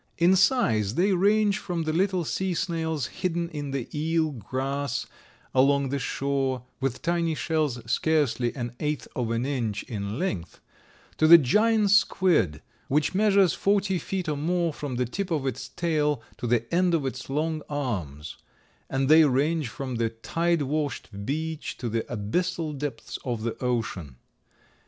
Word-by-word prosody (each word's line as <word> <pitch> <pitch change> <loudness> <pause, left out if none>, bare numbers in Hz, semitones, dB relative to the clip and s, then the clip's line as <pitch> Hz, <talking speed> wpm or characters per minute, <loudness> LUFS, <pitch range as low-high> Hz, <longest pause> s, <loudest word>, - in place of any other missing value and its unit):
In 175 +3 +5
size 120 - +2
they 195 +3 +3
range 205 +2 +3
from 175 -3 -3
the 155 0 -1
little 185 +1 +1
sea 185 +3 -1
snails 160 -5 -1
hidden 170 +3 -2
in 145 -3 -5
the 135 -3 -3
eel 160 +1 +1
grass 135 +2 -3 0.5
along 140 +1 +3
the 140 +1 -1
shore, 135 -1 -1 0.2
with 135 -2 -2
tiny 170 -2 +1
shells 155 -6 0
scarcely 130 -1 +1
an 120 -2 -5
eighth 150 -1 -2
of 120 -3 -1
an 115 +2 0
inch 115 -7 -2
in 105 -1 -4
length, 95 - -3 0.6
to 155 - +5
the 170 +1 +11
giant 210 - +3
squid, 175 - +3 0.2
which 150 +5 +1
measures 195 -3 +4
forty 195 -2 +1
feet 185 -1 -3
or 150 -2 -1
more 170 +2 0
from 145 -3 -5
the 125 +1 0
tip 190 - -4
of 155 -5 -1
its 130 0 -3
tail 150 -4 0
to 120 - -4
the 120 -1 +2
end 180 0 +3
of 150 -4 -1
its 130 0 -5
long 155 +3 -1
arms; 95 - -4 0.5
and 135 0 0
they 160 +2 +8
range 145 +1 +1
from 130 -1 -5
the 115 -1 +1
tide 165 +8 0
washed 140 -8 -3
beach 160 +2 -3
to 120 - -4
the 115 +1 0
abyssal 155 - -1
depths 140 -4 -5
of 120 -4 -3
the 115 - -2
ocean. 100 - -2
145 Hz, 160 wpm, -26 LUFS, 125-170 Hz, 0.6 s, the